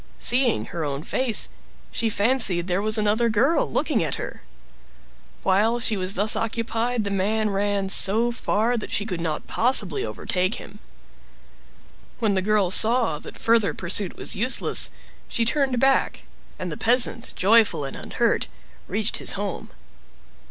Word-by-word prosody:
Seeing 245 -2 +2
her 170 - -4
own 140 0 -4
face, 250 +3 +1 0.4
she 230 - -2
fancied 205 -5 +3
there 180 +1 -1
was 215 +1 -1
another 215 +2 +1
girl 250 +10 +1
looking - - 0
at - - -3
her. - - -8 1.0
While 215 +5 +1
she 230 -2 0
was 185 0 -3
thus 210 +3 +3
occupied 230 +1 -2
the 200 - -4
man 210 +2 -1
ran 200 0 -1
so 220 +5 +4
far 235 +1 -1
that 215 - -6
she 205 - -2
could 180 -6 -5
not 160 -2 -4
possibly 220 - +1
overtake 180 - -2
him. 205 - -11 1.4
When 220 -4 0
the 190 - 0
girl 200 -2 0
saw 225 -6 +4
that - - -10
further 225 -2 +1
pursuit 185 +1 +1
was - - -2
useless, 240 +6 +2 0.4
she 230 - -2
turned 260 0 0
back, 270 +1 +1 0.3
and 180 -2 -6
the 150 - -6
peasant, 240 0 +2
joyful 200 -7 +2
and 135 - -7
unhurt, - - -1 0.4
reached - - 0
his - - +4
home. - - -5
215 Hz, 150 wpm, -23 LUFS, 190-235 Hz, 1.4 s, so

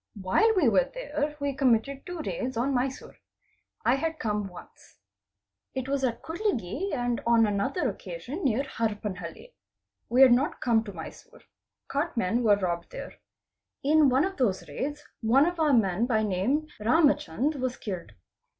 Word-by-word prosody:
While 200 - +3
we 345 -9 +4
were 195 -5 +3
there 305 -12 -3
we 285 -1 -1
committed 270 +1 +1
two 355 -3 -5
raids 255 -1 -3
on 265 +4 +1
Mysore. 260 +1 -3 0.7
I 250 +3 +4
had 320 +3 -2
come 210 -5 -2
once. 180 -2 -14 0.8
It 260 0 -3
was 275 0 -1
at 235 -2 -1
Kudlge 345 - -2
and 245 -3 -1
on 230 -1 +5
another 205 - 0
occasion 385 - -6
near 265 -1 +2
Harpanhalli. 215 - -4 0.6
We 255 +3 +6
had 260 - +8
not 260 +5 +2
come 230 -2 +2
to 205 - -6
Mysore. 320 - -11 0.5
Cart 290 +1 -2
"men 230 +3 +1
were 215 -3 +5
robbed 175 -3 -2
there. - - -7 0.7
In 300 0 +5
one 260 +6 +3
of 385 0 -5
those 210 -9 0
raids 295 +2 -4 0.2
one 250 +6 +4
of 350 0 -2
our 310 -2 +3
men 220 -2 +2
by 220 -3 +2
name 215 +10 0
"Ramachand 280 - +2
was 255 -1 -2
killed. 180 - -6
255 Hz, 160 wpm, -27 LUFS, 215-295 Hz, 0.8 s, had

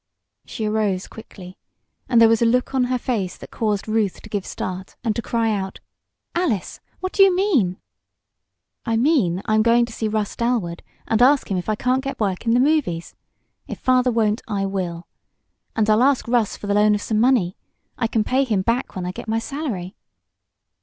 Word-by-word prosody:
She 220 - -4
arose 210 -3 0
quickly, 185 -4 -12 0.5
and 235 - +5
there 230 - +8
was 225 0 +3
a - - +4
look 250 +3 +1
on 260 -2 +2
her 255 0 0
face 220 -8 -2
that - - -12
caused 210 -3 -1
Ruth 215 -3 0
to 220 - -11
give 205 -3 -3
start 185 0 -6
and 220 -3 0
to 235 - -2
cry 225 -1 0
out: 190 -1 -5 0.5
"Alice! 330 - -1 0.2
What 370 0 -2
do - - +3
you 390 -2 +6
mean?" 285 - +2 1.1
"I 230 -2 0
mean 225 - +2
I'm 215 -1 +3
going 235 +1 +4
to 235 - -11
see 220 - -2
Russ 215 -1 -2
Dalwood 230 -8 -1 0.3
and 220 +1 +1
ask 270 -2 +4
him 190 - +1
if 180 - -6
I 215 - +1
can't 255 +4 0
get 275 - -5
work 200 +1 -2
in 230 - +4
the - - +4
movies. 260 - +1 0.5
If - - -6
father 255 0 +2
won't, 225 -2 +1
I 200 -3 -1
will! 180 -3 -4 0.7
And 220 -2 +1
I'll 215 +1 +4
ask 270 -1 +2
Russ 230 -3 +1
for - - -9
the 200 - 0
loan 210 0 +4
of 205 - -3
some 215 -1 0
money. 225 -7 +3 0.4
I 230 - 0
can 225 -1 0
pay 260 +5 +1
him 215 -7 0
back 230 +5 -1
when 185 -1 -4
I 180 - -2
get 190 - -9
my 220 +1 0
salary!" 225 - -4
220 Hz, 200 wpm, -22 LUFS, 200-250 Hz, 1.1 s, there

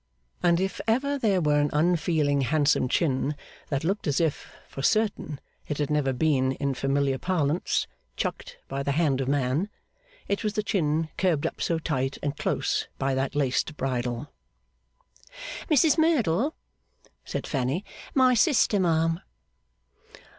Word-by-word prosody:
And 170 -1 +3
if 190 0 -2
ever 280 +5 +1
there 205 -7 +2
were 150 -2 +3
an 145 0 +2
unfeeling 155 -3 +2
handsome 145 0 +2
chin 145 -1 +1 0.3
that 140 -1 -1
looked 195 +3 -1
as 140 -2 +1
if, 160 -4 -1 0.2
for 135 - -7
certain, 205 -5 0 0.3
it 150 - -3
had 145 -1 -1
never 150 -3 +2
been, 130 -1 +1
in 140 0 -1
familiar 135 0 0
parlance, 170 -3 0 0.3
'chucked' - - -4
by 135 0 -3
the 140 0 0
hand 145 -4 +2
of 130 - -2
man, 140 +7 0 0.6
it 200 - -1
was 210 -1 -1
the 210 - -1
chin 160 -6 0
curbed 170 -6 +1
up - - -3
so 165 - +1
tight 135 -4 -2
and 145 0 -1
close - - -1
by 135 0 0
that 135 +2 -1
laced 145 +2 0
bridle. 125 0 -2 1.4
'Mrs 310 +1 +4
Merdle,' 285 - +2 0.7
said - - -4
Fanny. 135 +8 -1 0.3
'My 260 -2 +5
sister, 235 - +3
ma'am. 165 -2 +2
150 Hz, 145 wpm, -26 LUFS, 140-185 Hz, 1.4 s, My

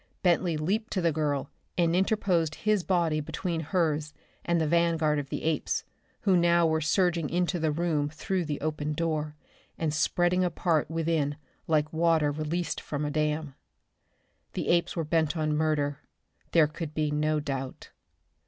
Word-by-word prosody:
Bentley 175 -2 +2
leaped 205 +9 -1
to 185 - 0
the 170 -1 +3
girl 145 -3 -1 0.3
and 170 -1 +3
interposed 180 -5 +1
his 210 -3 +3
body 170 -5 +1
between 165 +3 -3
hers 155 -2 -1 0.3
and 170 -1 +1
the 160 - +1
vanguard 165 -2 +2
of 140 -2 -6
the - - -4
apes, 160 -1 0 0.4
who 195 -3 +3
now 170 -1 +4
were 160 -1 +1
surging 170 -1 +1
into 175 +1 0
the 160 -1 +1
room 150 -2 0
through 175 +3 -2
the 150 -2 -3
open 150 0 -2
door, 155 -1 -2 0.4
and 160 -2 -1
spreading 175 +3 +2
apart 170 -3 +1
within 160 -3 0 0.3
like 155 -1 +1
water 160 -2 +3
released 155 +3 -2
from 150 0 -3
a 145 - -2
dam. 150 -1 -1 1.0
The - - -3
apes 170 0 +2
were 165 - -1
bent 160 +1 +1
on 155 -1 0
murder, 150 -2 0 0.5
there 165 -2 +6
could 150 0 -6
be 150 -1 0
no 155 +1 +1
doubt. 135 -3 -5
160 Hz, 160 wpm, -28 LUFS, 150-170 Hz, 1.0 s, there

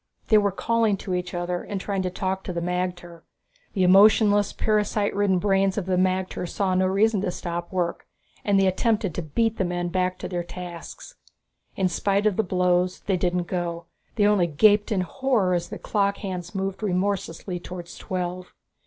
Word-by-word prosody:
They 215 - +7
were 200 -1 +1
calling 225 +1 +1
to 185 - -5
each 180 0 -3
other 175 0 -2
and 200 - -5
trying 195 0 -2
to 185 - -1
talk 190 +1 -3
to 180 - -4
the 170 - -2
magter. 175 -1 -3 0.5
The 190 - +1
emotionless, 205 +2 +5
parasite 210 -1 0
ridden 200 -2 +2
brains 195 +1 +1
of 200 - -1
the 185 0 0
magter 185 -1 0
saw 190 -2 0
no 185 0 +2
reason 205 +2 +2
to 195 - -1
stop 175 -1 -5
work, 175 -2 -2 0.4
and 200 -1 +3
they 195 - +4
attempted 200 0 +1
to 175 - -3
beat 225 +9 0
the - - +3
men 175 -1 -2
back 185 0 0
to - - -5
their 175 -1 -2
tasks. 180 - -9 0.6
In 190 - +1
spite 200 +3 0
of 210 -3 +3
the - - +2
blows, 180 -1 +1
they 195 - 0
didn't 180 0 0
go; 170 -1 -3 0.3
they 205 - +3
only 205 -4 +3
gaped 205 +7 +4
in 195 -3 +1
horror 215 -1 0
as 175 -1 -1
the - - -6
clock 200 -1 0
hands 180 -2 -6
moved 195 +1 -3
remorselessly 185 -2 -2
towards 175 0 -8
twelve. 180 0 -4
185 Hz, 190 wpm, -25 LUFS, 180-205 Hz, 0.6 s, They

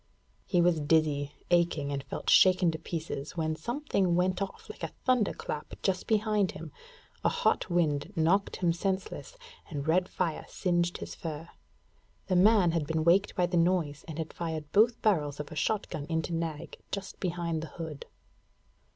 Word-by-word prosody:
He 175 -3 +3
was 175 -2 +3
dizzy, 145 -2 +2 0.2
aching, 170 -5 +2
and 140 -1 -3
felt - - -7
shaken 185 -2 +6
to 160 - -6
pieces 160 -2 -5
when 160 -1 0
something 200 - 0
went 185 +2 +1
off 195 - -5
like - - -10
a - - -5
thunderclap 215 - 0
just 190 -2 0
behind 210 -3 +2
him; 160 -1 -8 0.5
a - - +4
hot - - +1
wind 155 -5 +1
knocked 175 +5 +2
him 175 -2 +1
senseless, 190 - -3 0.3
and 145 -2 -4
red 180 +3 +2
fire 160 -3 -2
singed 175 -2 0
his - - -7
fur. 160 0 -6 0.8
The 185 - 0
man 190 -1 +5
had 165 -3 -1
been 160 0 0
wakened 185 +5 +3
by 180 - +3
the 175 0 0
noise, 165 -4 +1
and 160 -2 -6
had 160 -1 -4
fired 160 -3 -4
both 225 +3 +4
barrels 150 -9 +1
of 150 - -6
a - - -7
shot 210 +7 0
gun 145 -1 -4
into 160 +1 -1
Nag 165 -1 -4
just 195 -2 -5
behind 170 -3 -2
the 160 - -5
hood. 160 -4 -6
170 Hz, 170 wpm, -30 LUFS, 155-185 Hz, 0.8 s, shaken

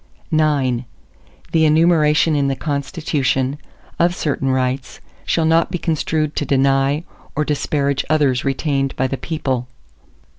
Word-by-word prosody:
ARTICLE 155 -1 +3 0.2
IX 125 - -10 0.7
The 160 -1 +3
enumeration 155 0 +4
in 140 -1 +1
the 135 - 0
Constitution, 140 -2 -1 0.4
of 175 +1 +3
certain 140 -4 -1
rights, 130 0 -1 0.3
shall 165 - +1
not 165 +1 +3
be 180 - -2
construed 155 -2 -1
to - - +1
deny 135 +2 +2 0.3
or 150 - 0
disparage 140 -1 0
others 145 -5 +2
retained 135 0 -1
by 130 - 0
the 135 +1 -2
people. 130 -7 -3
145 Hz, 135 wpm, -19 LUFS, 135-155 Hz, 0.7 s, enumeration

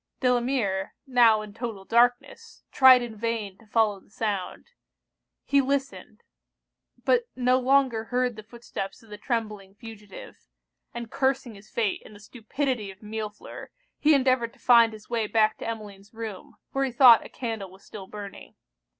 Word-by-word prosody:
Delamere, 240 -6 0
now 235 -5 +4
in 210 -1 -11
total 225 -5 -6
darkness, 245 +2 0
tried 260 -2 +7
in 230 -2 -7
vain 215 -3 -4
to 225 - -20
follow 215 -2 +1
the - - -26
sound. 205 -3 -4 0.8
He 280 0 +3
listened 275 0 -4 0.8
but 480 -1 +2
no 255 0 +2
longer 260 -3 +2
heard 250 0 -1
the 215 - -9
footsteps 230 -1 -8
of 220 - -19
the 210 - -9
trembling 210 -5 -4
fugitive; 210 -3 -12 0.5
and 235 -1 -7
cursing 265 -3 -1
his 200 +1 -16
fate, 220 -4 -1
and 215 - -14
the - - -14
stupidity 240 +1 -4
of 195 +2 -13
Millefleur, 210 0 -7 0.3
he 305 0 +5
endeavoured 255 -3 +1
to - - -24
find 235 -2 +5
his 215 -1 -13
way 230 -2 -1
back 215 0 +2
to - - -6
Emmeline's 210 -2 -8
room, 220 -4 -8 0.2
where 275 0 0
he 265 - -3
thought 240 -1 +7
a - - -11
candle 225 -6 -5
was 190 +2 -18
still 195 -3 -10
burning. 205 -1 -10
225 Hz, 160 wpm, -26 LUFS, 210-250 Hz, 0.8 s, tried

